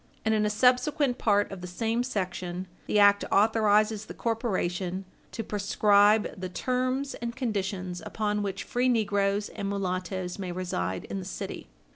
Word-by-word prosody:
And 220 - +3
in 210 -1 +2
a - - +1
subsequent 255 +4 +2
part 205 -2 +2
of 195 -2 -7
the 180 - -6
same 225 +6 -1
section, 185 -6 -3 0.2
the - - +1
act 205 0 +6
authorizes 215 0 +3
the - - -8
corporation 190 -5 -2 0.3
"to 225 - -4
prescribe 205 +1 +3
the 185 - -3
terms 255 +6 -1
and 235 0 -5
conditions 195 -7 -3
upon 210 -1 -1
which 200 -2 -3
free 250 +1 +1
negroes 205 -3 +1
and 200 - -4
mulattoes 185 -1 -3
may 185 -2 -4
reside 95 - -3
in 195 - -4
the - - -6
city." 185 - -6
205 Hz, 155 wpm, -28 LUFS, 185-225 Hz, 0.3 s, act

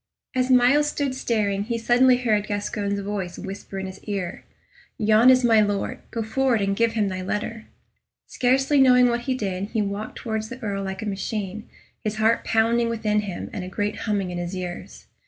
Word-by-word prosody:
As 255 0 0
Myles 260 +4 +5
stood 285 -3 -2
staring, 210 -6 -1
he 235 +1 -2
suddenly 245 +2 +4
heard 215 -4 +1
Gascoyne's 205 -1 -2
voice 195 -3 -4
whisper 195 0 -7
in 190 - -3
his 190 0 -9
ear, 195 -4 -4 0.5
"Yon 220 +1 +5
is 255 0 +5
my 225 -2 +5
Lord; 205 +5 -1
go 230 -2 -3
forward 250 +1 +1
and 195 -1 0
give 230 +1 +2
him 215 -3 +1
thy 185 -1 -3
letter." 215 +4 -4 0.6
Scarcely 270 +3 +2
knowing 250 -1 +6
what 240 0 0
he 260 - +2
did, 195 -5 -3
he 220 +1 -2
walked 200 +2 -4
towards 220 -2 -4
the 255 - -7
Earl 200 -2 -2
like 190 +2 -5
a - - -4
machine, 205 +1 -4 0.3
his 215 -1 -2
heart 220 +1 +2
pounding 230 +1 +2
within 215 -2 0
him 200 -4 -5
and 185 - -4
a 185 - -6
great 205 +2 -2
humming 200 -4 -1
in 175 - -4
his 175 +2 -4
ears. 180 -1 -7
215 Hz, 190 wpm, -24 LUFS, 200-240 Hz, 0.6 s, knowing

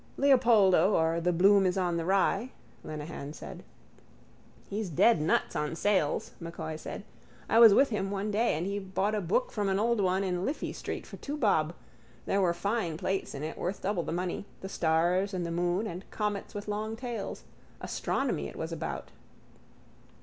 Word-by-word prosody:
—Leopoldo 225 - +5
or 165 +1 +2
the 180 +1 +2
Bloom 195 +3 +5
is 180 - 0
on 180 -2 +1
the 165 - -2
Rye, 195 +5 +1 0.3
Lenehan 150 -1 -6
said. - - -9 1.1
—He's 205 -1 -3
dead 170 +3 +4
nuts 155 - +1
on 150 +2 -1
sales, 190 -5 +1
M'Coy 165 -2 -5
said. 155 - -7 0.4
I 225 - +4
was 225 -4 +9
with 275 - +5
him 195 -2 -1
one 200 +1 -2
day 220 -1 +2
and 160 +3 -2
he 200 +1 -2
bought 190 +2 -1
a 210 - 0
book 190 +8 0
from 205 -2 -1
an 190 - +1
old 230 +1 +2
one 190 +1 +1
in 180 -1 -1
Liffey 280 +8 -2
street - - -5
for - - -10
two 290 +1 -5
bob. 175 - +2 0.5
There 195 - +1
were 180 -2 +3
fine 200 -3 -1
plates 190 -3 -2
in 140 - -5
it 155 - -5
worth 185 +3 -3
double 190 -2 0
the - - -5
money, 180 +3 -3 0.2
the 190 - -6
stars 175 +4 +1
and 180 -2 -2
the 170 - -3
moon 175 +4 0
and 185 -2 -7
comets 210 -2 -3
with 205 +1 -5
long 215 +1 -3
tails. 235 -3 -5 0.4
Astronomy - - -2
it - - -10
was - - -4
about. - - -5
190 Hz, 185 wpm, -29 LUFS, 170-210 Hz, 1.1 s, was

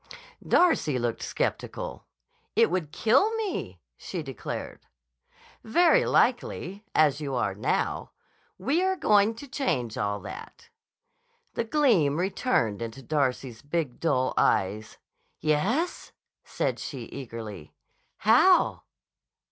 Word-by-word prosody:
Darcy 165 - +3
looked 120 -2 -2
skeptical. - - -3 0.5
"It - - +4
would 175 -5 -2
kill 270 - +3
me," 370 - -4 0.2
she 175 - -6
declared. 135 -6 -7 0.8
"Very 330 +9 +4
likely, 210 -5 +1
as 150 -1 +3
you 140 -3 -3
are 105 -5 0
now. 100 - -1 0.5
We're 340 - +1
going 210 - +3
to 280 +5 -10
change 130 - -2
all 100 0 -1
that." - - -10 0.8
The 230 - -2
gleam 220 - +3
returned 180 - 0
into 115 +3 -6
Darcy's 130 -4 -1
big, 145 -3 -3
dull 130 -6 +1
eyes. 105 +3 +1 0.4
"Yes?" 205 - 0 0.3
said - - -2
she 135 -4 -6
eagerly. 115 - -8 0.4
"How?" - - +4
155 Hz, 105 wpm, -27 LUFS, -, 0.8 s, It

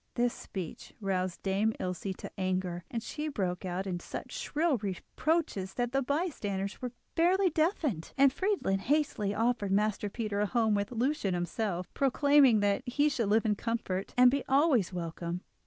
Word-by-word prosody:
This 240 0 +2
speech 185 -5 -7
roused 185 -3 -2
Dame 200 +3 +1
Ilse 185 +1 -3
to - - -8
anger, 185 -2 -2
and 230 -1 -3
she 300 +5 -4
broke 190 -9 -2
out 185 +1 -2
into 180 -2 -4
such - - -7
shrill 310 -2 0
reproaches 200 - -2
that 245 -1 -1
the 270 +1 +1
bystanders 250 - -2
were 250 -1 -3 0.2
fairly 360 +2 +3
deafened, 310 - 0
and 275 -1 +6
Friedlin 375 - 0
hastily 225 -5 0
offered 225 -2 +1
Master 210 +1 +1
Peter 210 -1 -3
a 210 - +2
home 225 -1 +2
with 200 +1 0
Lucia 250 0 0
and 185 - 0
himself, 180 +1 -2
promising 275 -4 +4
that 200 -1 +2
he 290 +4 +2
should 235 -7 -1
live 220 +2 +3
in 215 - +3
comfort, 205 -3 -3
and 250 0 +7
be 280 0 0
always 270 - +3
welcome. 170 0 -4
215 Hz, 170 wpm, -31 LUFS, 190-275 Hz, 0.2 s, and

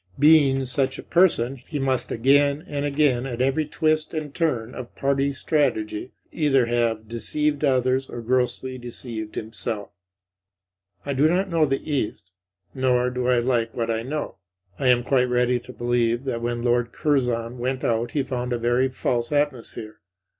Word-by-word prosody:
Being 145 -3 +5
such 130 +1 0
a - - -8
person, 135 -8 +3
he 140 +5 -7
must 135 -2 -1
again 140 +5 +3
and 145 -1 -3
again, 140 -3 +1
at 120 -2 -5
every 135 +4 +1
twist 155 +1 0
and 150 -2 -4
turn 125 -9 -1
of 125 -2 -8
party 140 0 +1
strategy, 130 -7 -1 0.2
either 135 -5 +2
have 115 -2 0
deceived 145 +6 -1
others 130 -1 +2
or 120 - -6
grossly 130 +2 0
deceived 115 -3 -7
himself. 110 -1 -4 1.1
I 140 - -1
do 140 +3 +4
not 185 +2 0
know 160 -2 +3
the 135 +2 -2
East; 110 -9 -3 0.4
nor 125 -2 +1
do 125 0 -2
I 125 -1 +4
like 120 -2 0
what 115 -1 -1
I 110 0 -1
know. 140 -2 -4 0.4
I 135 - +1
am 125 -1 +4
quite 125 -1 +2
ready 125 0 +2
to 120 +1 -12
believe 120 0 0
that 125 -4 -3
when 120 0 -2
Lord 120 -1 +1
Curzon 125 -5 0
went 130 +2 -2
out 115 +1 0
he 145 - +1
found 125 -2 -3
a - - 0
very 120 +3 +1
false 120 -1 -1
atmosphere. 130 -7 -2
125 Hz, 165 wpm, -24 LUFS, 120-140 Hz, 1.1 s, Being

